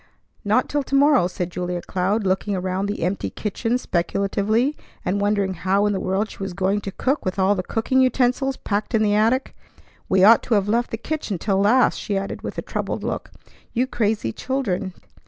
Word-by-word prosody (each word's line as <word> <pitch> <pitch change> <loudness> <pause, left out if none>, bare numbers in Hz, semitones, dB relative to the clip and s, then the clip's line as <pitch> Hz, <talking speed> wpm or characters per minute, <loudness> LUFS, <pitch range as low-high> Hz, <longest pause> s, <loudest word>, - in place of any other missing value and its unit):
"Not - - +2
till 290 - 0
to 275 0 -3
morrow," 280 -8 +5
said 180 -1 -4
Julia 180 0 -3
Cloud, 195 +3 -1
looking 190 +2 0
around 185 +1 -2
the 205 -4 -3
empty 185 +3 -1
kitchen 225 +3 -2
speculatively, 200 - 0 0.3
and 200 +3 0
wondering 200 -2 +1
how 190 +3 +1
in 205 - +1
the 190 - -1
world 195 +4 0
she - - -13
was 195 -2 -4
going 195 +2 0
to 195 - -5
cook 265 +8 -1
with 185 +1 -2
all 190 +1 +3
the 190 - -1
cooking 230 +7 +1
utensils 260 +1 +1
packed 210 +3 -2
in 220 - +3
the 205 -1 +2
attic. 225 +5 +1 0.5
"We 190 0 +4
ought 225 +3 +8
to 230 - 0
have 200 -1 +1
left 235 +3 +1
the 225 - -4
kitchen 235 - -3
till 195 +2 0
last," 230 +6 +3
she 200 -3 -2
added 195 0 -4
with - - -6
a - - -3
troubled - - -3
look. - - -3 0.4
"You 250 +1 +2
crazy 215 - -1
children! 200 -9 -2
205 Hz, 200 wpm, -22 LUFS, 190-240 Hz, 0.5 s, ought